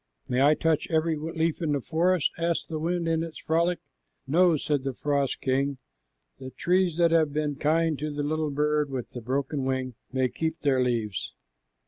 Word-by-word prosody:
"May 125 +1 +1
I 145 +2 +6
touch 160 -1 +1
every 160 0 +1
leaf 160 +2 -2
in 155 -3 0
the 140 - +1
forest?" 170 +4 +1
asked 170 0 -1
the 160 -1 -3
wind 170 +1 -1
in 165 0 +1
its 165 -2 -6
frolic. 170 +2 +1 0.5
"No," 165 +4 +4
said 145 -1 -1
the 135 -2 -3
frost 140 -2 -1
king. 135 +1 0 0.6
"The 130 - -7
trees 180 +3 +1
that 170 -1 +4
have 160 -3 +3
been 150 -1 -1
kind 155 +1 +1
to 150 +1 -3
the 145 0 -3
little 155 +1 -1
bird 150 +1 +1
with 130 -3 -5
the 120 - -7
broken 135 +3 -2
wing 130 -1 -1 0.2
may 130 -1 +1
keep 160 +5 -3
their 135 -3 +2
leaves." 115 -6 -2
150 Hz, 185 wpm, -27 LUFS, 135-165 Hz, 0.6 s, I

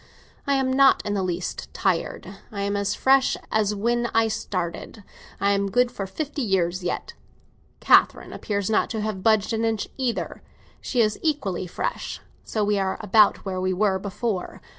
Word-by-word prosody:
I 280 - +3
am 260 -1 +1
not 270 0 +5
in 205 - -1
the 200 - 0
least 180 -1 -4
tired; 190 +1 -1 0.2
I 200 -2 -3
am 200 0 -1
as 200 0 0
fresh 265 0 +3
as 210 -1 +1
when 235 +3 0
I 225 0 +4
started; 200 -1 -4 0.4
I 200 - +2
am 200 0 +1
good 245 +3 +2
for 195 -5 -5
fifty 290 +8 -4
years 185 -5 0
yet. 175 - -3 0.7
Catherine - - +4
appears 200 -2 -2
not 220 - +2
to 220 -2 -3
have 210 -3 -3
budged 220 +1 +2
an 225 0 0
inch 225 -2 0
either; 255 -3 -2 0.4
she 245 - 0
is 215 -1 +1
equally 205 - -1
fresh; - - -4 0.2
so 215 - -2
we 205 -1 +1
are 190 -1 -1
about 210 0 +4
where 185 -1 -3
we 185 0 0
were 190 0 +1
before. 200 0 -3
210 Hz, 175 wpm, -24 LUFS, 190-230 Hz, 0.7 s, not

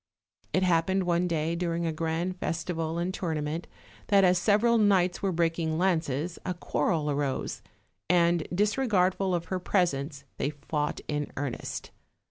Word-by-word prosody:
It 185 - +2
happened 185 +2 +2
one 175 0 +1
day, 165 0 0
during 170 -1 -1
a 165 - -1
grand 165 +3 -2
festival 165 0 -2
and 175 +2 -1
tour 170 -4 -2
nament, 150 +3 -3 0.4
that 200 -1 +5
as 180 -1 +4
several 225 +5 +3
knights 190 -4 +3
were 195 - +1
breaking 165 -2 0
lances, 165 -3 0
a 180 - -2
quarrel 160 -3 0
arose, 140 -2 -2 0.5
and, 170 -2 +3
disregardful 195 -2 +2
of 170 -1 -2
her 185 - 0
presence, 145 -7 0
they - - 0
fought 150 0 -3
in 150 -1 -2
earnest. 140 -3 -4
170 Hz, 145 wpm, -28 LUFS, 160-185 Hz, 0.5 s, that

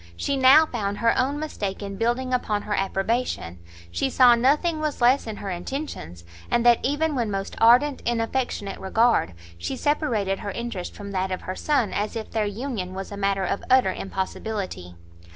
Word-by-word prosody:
She 275 - -1
now 270 +4 +7
found 205 -7 -3
her 230 +1 +2
own 265 +3 0
mistake 205 -11 -4
in 200 0 -5
building 240 +4 -1
upon 210 -4 0
her 210 - -3
approbation; 195 - -1 0.3
she 265 - 0
saw 250 -2 +6
nothing 295 +7 +2
was 305 -1 -2
less 245 +1 +3
in 220 - -4
her 200 -1 -5
intentions, 175 - -6 0.3
and 240 0 +1
that 240 -1 +6
even 295 +3 0
when 240 -5 -1
most 195 -1 -4
ardent 250 +5 +5
in 235 0 0
affectionate 225 -4 -2
regard, 220 - +2 0.2
she 85 - -4
separated 230 -11 0
her 205 - -5
interest 220 -4 -5
from 200 -1 -8
that 190 0 -1
of 185 - -3
her 185 - -5
son 265 -7 0
as 210 +3 -2
if 225 -1 -5
their 215 -2 0
union 205 -4 -4
was 195 +1 -6
a - - -5
matter 195 -1 0
of 200 - -2
utter 255 -7 +4
impossibility. 190 - -5
225 Hz, 185 wpm, -24 LUFS, 195-255 Hz, 0.3 s, now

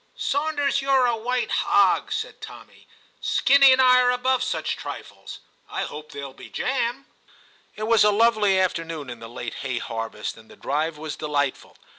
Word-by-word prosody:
'Sawnders, 285 -1 0
you're 270 -2 +3
a 240 -1 +2
white 245 +2 -2
hog,' - - +2
said - - -4
Tommy; - - -12 0.2
' - - -38 0.2
Skinny 275 -1 +6
and 260 - +4
I 255 -1 +6
are 250 - +3
above 250 +1 +1
such 255 0 -2
trifles. - - -9 0.3
I - - -3
hope 150 0 -8
there'll 140 -2 -7
be - - -13
jam.' 255 +1 -2 0.7
It 215 - -6
was 225 0 +4
a 210 - +5
lovely 210 -2 +3
afternoon 165 -6 -2
in 120 - -9
the 115 - -10
late 120 0 -6
hay 130 -2 -3
harvest, 115 -2 -5
and 110 0 -17
the - - -14
drive 150 +3 -2
was 155 0 -6
delightful. 145 -3 -2
215 Hz, 175 wpm, -24 LUFS, -, 0.7 s, Skinny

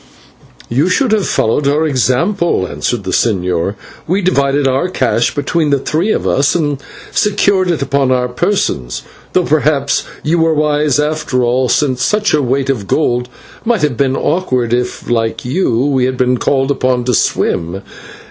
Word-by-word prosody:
"You 140 +9 +1
should 240 +6 +1
have 210 -4 +1
followed 140 +6 +1
our 150 +3 +2
example," 145 - +1
answered 120 +2 -3
the 95 - -4
señor; 90 -2 0 0.3
"we 190 +4 0
divided 140 -5 +2
our 135 +7 0
cash 120 -8 0
between 150 +2 0
the 140 - +3
three 160 +9 -1
of - - -1
us 140 +1 +2
and 145 -5 -1 0.3
secured 200 -2 +1
it 165 -5 0
upon 140 -1 +1
our 125 -1 +1
persons, 125 - -1 0.3
though 185 - +3
perhaps 150 -3 +1 0.2
you 165 +3 +1
were 160 -1 +2
wise 150 -1 +1
after 150 -4 0
all, 125 +1 +1
since 130 -1 +1
such 210 +4 +1
a 150 - +3
weight 135 +1 0
of 105 -7 -4
gold 125 -1 0 0.3
might 230 -6 0
have 145 -4 +1
been 135 +2 +1
awkward 130 -9 0
if, 125 0 -2
like 115 -1 -1
you, 125 -3 0
we 135 -3 +1
had 130 0 -2
been 125 -1 +1
called 135 0 +1
upon 130 -2 0
to 125 0 0
swim. 90 -2 0
140 Hz, 165 wpm, -14 LUFS, 125-155 Hz, 0.3 s, the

